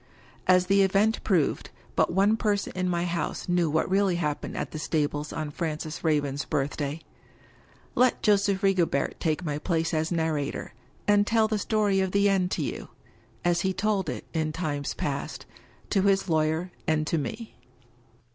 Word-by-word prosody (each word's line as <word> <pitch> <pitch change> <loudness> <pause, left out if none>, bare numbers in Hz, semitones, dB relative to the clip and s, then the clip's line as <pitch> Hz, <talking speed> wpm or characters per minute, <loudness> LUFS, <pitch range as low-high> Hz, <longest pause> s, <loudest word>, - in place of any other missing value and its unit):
As 180 0 +5
the 195 +2 +4
event 200 +3 +2
proved, 175 -8 +1 0.3
but - - +2
one 195 +4 +3
person 210 -2 -1
in 185 0 0
my 175 0 0
house 175 -1 -3
knew 175 -2 +2
what 160 +2 +1
really 195 -1 +2
happened 150 -4 -2
at - - -3
the 155 - -5
stables 150 -1 -1
on 155 -2 -4
Francis 155 0 -4
Raven's 145 -3 +1
birthday. 145 +1 -2 0.9
Let 250 0 +2
Joseph 200 -1 +3
Rigobert 175 -8 +1
take 160 +2 -1
my 150 -1 -2
place 165 0 -1
as 160 +1 0
narrator, 160 -8 -2 0.3
and 205 0 +4
tell 225 -1 +3
the 215 -1 -1
story 205 -2 +1
of 190 -1 0
the 200 0 +4
end 190 -2 +2
to 165 - -1
You - - -4 0.3
— 115 0 -25
^as 175 0 +3
he 190 +1 0
told 195 -2 0
it, - - -5
in 160 -2 0
times 150 -3 -3
past, - - -4 0.5
to 195 - +3
his 195 0 +2
lawyer 160 +2 +1 0.2
and 155 -1 +2
to 160 +1 0
Me. 220 - -5
175 Hz, 170 wpm, -27 LUFS, 155-195 Hz, 0.9 s, As